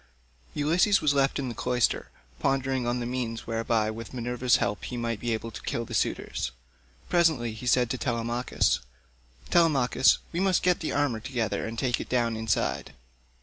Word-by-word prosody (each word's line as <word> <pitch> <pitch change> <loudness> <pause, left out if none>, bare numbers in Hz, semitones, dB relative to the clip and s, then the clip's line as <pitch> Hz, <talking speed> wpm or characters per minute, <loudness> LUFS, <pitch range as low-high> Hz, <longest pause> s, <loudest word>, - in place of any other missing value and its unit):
Ulysses 175 +7 +3
was 150 -2 +2
left 135 -1 +2
in 140 - -2
the 120 - -4
cloister, 125 0 0 0.3
pondering 135 -2 0
on 120 +1 0
the 120 - -3
means 120 -2 -3
whereby 115 -1 0
with 115 +2 -8
Minerva's 125 0 +1
help 100 0 -1
he 125 - -5
might 115 -2 -2
be 120 +1 -2
able 115 +1 -3
to - - -8
kill 115 - -3
the - - -9
suitors. - - -1 0.6
Presently 160 -10 +2
he 110 +3 -7
said 125 0 +4
to 130 - -2
Telemachus, 120 0 0 0.7
"Telemachus, 140 -6 +4
we 170 - -2
must 190 -1 +2
get 180 -1 +3
the 160 - -3
armour 140 -6 0
together 115 -2 -2
and 115 +1 -6
take 125 0 0
it - - -8
down 120 -2 +1
inside. 110 -9 -1
125 Hz, 175 wpm, -27 LUFS, 115-135 Hz, 0.7 s, said